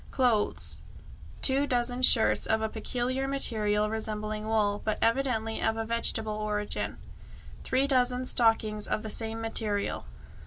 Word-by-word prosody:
Clothes: 240 -5 +1 0.6
2 275 +1 +3
dozen 245 0 -1
shirts 240 -3 +4
of 220 - +2
a 220 - -1
peculiar 250 +4 -2
material 215 -6 +1
resembling 215 0 -4
wool, 210 -2 0
but 215 - -1
evidently 230 -2 0
of 220 - 0
a 225 - -2
vegetable 225 -1 0
origin; 210 -1 -3 0.7
3 260 +1 +1
dozen 255 -2 +1
stockings 225 -4 +2
of 215 - -2
the 220 - -4
same 225 0 -1
material. 215 - -1
225 Hz, 130 wpm, -28 LUFS, 215-250 Hz, 0.7 s, shirts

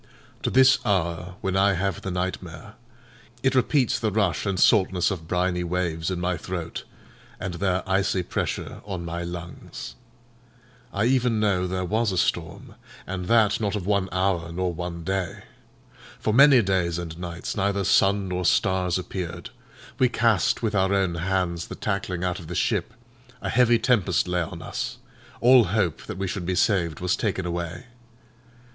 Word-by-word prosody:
To - - 0
this 130 0 +5
hour, 90 -3 -1
when 95 -1 -1
I 100 +1 +4
have 95 0 -2
the - - -4
nightmare, 90 -2 -4 0.7
it 135 0 +3
repeats 130 0 +2
the 110 - 0
rush 100 -3 0
and 95 -2 -1
saltness 95 -3 +4
of 80 -4 -5
briny 90 0 0
waves 85 -2 -1
in 90 -2 -2
my 90 0 -1
throat, 85 0 -5 0.5
and 90 - -4
their 95 +1 -1
icy 95 -1 +1
pressure - - -3
on 95 -4 -5
my 85 +1 -4
lungs. 85 0 -7 1.0
I 100 +2 0
even 125 -3 +2
know 95 -4 +1
there 90 0 -2
was 110 +3 +1
a 95 - -2
storm, - - -2 0.3
and 90 -1 -4
that 110 -1 +3
not 105 -1 0
of 100 -4 -4
one 100 -2 +1
hour 95 -3 0
nor 90 +1 -1
one 85 0 -5
day. 95 -1 -3 0.8
For 110 - 0
many 135 -1 +7
days 90 -3 0
and 85 -2 -5
nights 85 -1 -5
neither 100 -1 0
sun 100 +1 +3
nor 90 0 -2
stars 90 -1 +2
appeared; 90 -2 -5 0.5
we 130 - +4
cast 115 -4 +2
with 110 -2 0
our 95 -1 +2
own 95 -3 +1
hands 85 -1 -1
the - - -7
tackling 100 -3 -2
out 90 -1 -1
of 85 - -10
the 90 - -5
ship; 110 - 0 0.4
a - - -4
heavy 120 -2 +4
tempest 100 -9 +2
lay 90 0 0
on 85 0 -6
us; - - -4 0.4
all 125 -1 +7
hope 95 -5 0
that - - -5
we 95 - -2
should 95 -2 -4
be 90 - 0
saved 85 -5 +1
was 90 +1 +1
taken 95 -4 -2
away. 85 +5 -4
95 Hz, 170 wpm, -25 LUFS, 85-100 Hz, 1.0 s, many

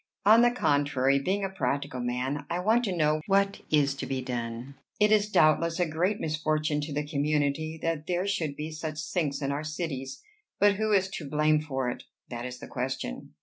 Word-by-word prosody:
"On 220 +3 +7
the 240 - +6
contrary, 145 - +2
being 190 +8 -1
a 195 - -1
practical 140 -6 -2
man, 130 +4 -2
I 170 - -1
want 220 +7 +2
to 185 -4 -2
know 155 -1 +2
what 200 0 +2
is 145 -2 +3
to - - -4
be 135 -1 -2
done. 120 0 -4 0.3
It 210 0 +4
is 210 -1 +4
doubtless 165 -1 +3
a 175 - +3
great 175 +6 0
misfortune 155 -1 0
to 145 +1 -5
the 145 +1 -2
community 150 +1 0
that 165 -2 -2
there 180 +1 0
should 165 -8 -1
be 155 +2 -5
such 155 -1 -5
sinks 155 -2 -2
in 140 - 0
our 145 +2 -2
cities; 155 - -5 0.4
but 205 -1 +4
who 215 0 0
is 190 -2 +3
to 155 -6 -6
blame 150 +1 +3
for 135 -4 -2
it? 125 - -4 0.3
that 120 +1 -4
is 125 0 -7
the - - -10
question." 125 - -4
155 Hz, 200 wpm, -28 LUFS, 140-180 Hz, 0.4 s, On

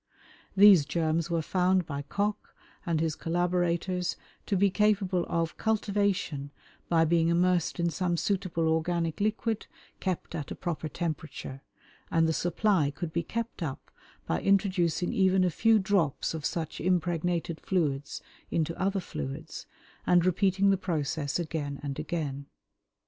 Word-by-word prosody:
These 195 -6 +8
germs 160 +1 0
were 165 -1 0
found 185 +1 +2
by 140 -2 -4
Koch 205 +8 -3 0.3
and 165 -2 +1
his 160 -1 0
collaborateurs 175 +1 0 0.3
to 200 - +1
be 200 +1 +3
capable 195 -4 +2
of 165 -1 -1
cultivation 200 -9 0 0.4
by 165 -1 +4
being 165 0 +3
immersed 175 0 +2
in 170 0 +1
some 175 0 0
suitable 180 -4 0
organic 165 0 0
liquid 215 +1 -1 0.3
kept 185 -3 -3
at 155 -4 -4
a - - -5
proper 160 -3 -3
temperature, 155 -4 -5 0.5
and 165 0 +3
the 160 - +1
supply 175 -2 +2
could 155 +3 -6
be 170 - +1
kept 230 +5 -4
up 145 -5 -5 0.3
by 80 - -1
introducing 185 -3 +2
even 190 -1 +3
a 180 - +2
few 225 +7 +4
drops 190 -9 +1
of 160 -3 -2
such 165 -3 -4
impregnated 175 -1 0
fluids 145 -6 -1 0.3
into 165 0 -1
other 195 +1 +1
fluids, 70 - -6 0.4
and 175 -1 +5
repeating 195 +2 +3
the 195 - +3
process 155 -5 -2
again 155 -4 -3
and 140 0 -4
again. 145 -3 -3
170 Hz, 140 wpm, -29 LUFS, 160-190 Hz, 0.5 s, These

